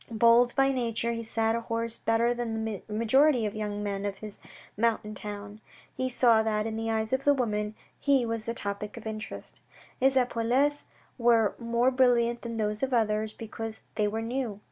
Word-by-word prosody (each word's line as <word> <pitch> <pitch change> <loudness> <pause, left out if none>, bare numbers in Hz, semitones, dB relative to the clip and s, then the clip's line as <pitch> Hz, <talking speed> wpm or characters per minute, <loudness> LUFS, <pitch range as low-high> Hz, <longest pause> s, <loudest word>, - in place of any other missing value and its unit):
Bold 235 +2 +4
by 270 0 +4
nature, 235 -2 0
he 230 0 -3
sat 225 0 0
a 235 - -2
horse 230 0 -2
better 230 +2 +2
than 225 -2 -3
the 215 -3 -4
majority 235 +4 +3
of 205 - -2
the 215 - -6
young 205 -1 -3
men 200 -1 -3
of 200 -1 -4
this 215 -2 -7 0.4
mountain 215 -1 0
town. 205 +1 -7 0.3
He 260 0 -1
saw 240 -3 +5
that, 215 -1 0
in 220 -1 -3
the 225 0 -2
eyes 220 +1 -1
of 260 +1 +1
the 285 0 +4
women, 210 -4 -1 0.2
he 275 -4 +3
was 225 -1 -3
the 230 - -3
topic 205 +1 -4
of 230 - -9
interest. 220 0 -6 0.4
His 265 +1 +3
epaulettes 255 +4 +1 0.3
were 230 -3 +4
more 235 +2 +1
brilliant 240 -2 +3
than 230 -1 -5
those 210 -1 -1
of 270 - 0
the 250 - +2
others, 215 -1 0
because 225 0 -6
they 210 - +1
were 220 +2 -2
new. 235 -3 -3
225 Hz, 195 wpm, -28 LUFS, 215-240 Hz, 0.4 s, saw